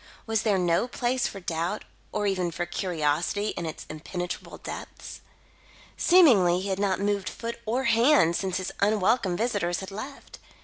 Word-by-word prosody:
Was 220 -2 +1
there 210 -3 +2
no 175 +5 +2
place 250 0 0
for 195 - -7
doubt 175 +3 -2 0.3
or 210 -1 -1
even 185 -3 0
for 175 +1 -3
curiosity, 175 +3 -1
in 170 - -4
its 155 - -7
impenetrable 175 +3 -6
depths? - - -8 0.7
Seemingly, 225 - +5
he 195 +2 -4
had 190 0 -1
not 195 -2 +1
moved 200 -1 0
foot 235 0 -6
or 245 +4 0
hand 230 - +4
since 190 -1 -1
his 185 -1 -3
unwelcome 205 -2 +2
visitors 205 -7 0
had 190 0 -7
left. 260 +8 -8
195 Hz, 160 wpm, -27 LUFS, 175-225 Hz, 0.7 s, Seemingly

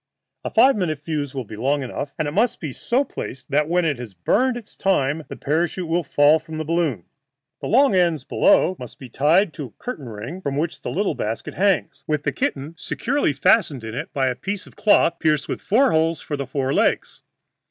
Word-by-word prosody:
A - - -2
five 270 +1 +5
minute 170 -8 -1
fuse 150 -4 -3
will 130 - -2
be 110 - -10
long 135 +6 0
enough, 140 +3 -5
and 155 - -1
it - - -2
must 230 +8 +1
be 150 -5 -5
so 250 - 0
placed 130 - -8
that 150 +2 +2
when 175 0 +2
it 145 -6 0
has 115 -6 -8
burned 245 - +1
its 230 -3 -11
time 155 -5 +1
the - - -7
parachute 170 +4 -1
will 170 +2 +1
fall 145 +2 +4
from 160 0 -8
the 155 - -3
balloon. 160 - 0 0.6
The - - -5
long 270 0 +4
ends 170 -6 +2
below 185 - +3
must 125 -2 -9
be 130 - -11
tied 155 - +3
to 145 - -6
a 120 - -12
curtain 155 - -5
ring, 115 - -7
from 140 -5 -3
which 160 +2 -2
the - - -4
little 200 +2 0
basket 110 +2 -4
hangs, 175 -7 0
with 150 -1 -1
the 140 - 0
kitten 140 +4 -2
securely 280 - 0
fastened 145 - +2
in 110 -1 -6
it 140 +7 -5
by 135 -2 0
a 130 - +1
piece 195 +9 -5
of - - -17
cloth 185 -5 +3
pierced 150 -2 +1
with - - -4
four 255 +6 +3
holes 160 0 +2
for 150 - -4
the 140 -2 -4
four 135 0 -1
legs. - - 0
155 Hz, 220 wpm, -22 LUFS, 135-180 Hz, 0.6 s, five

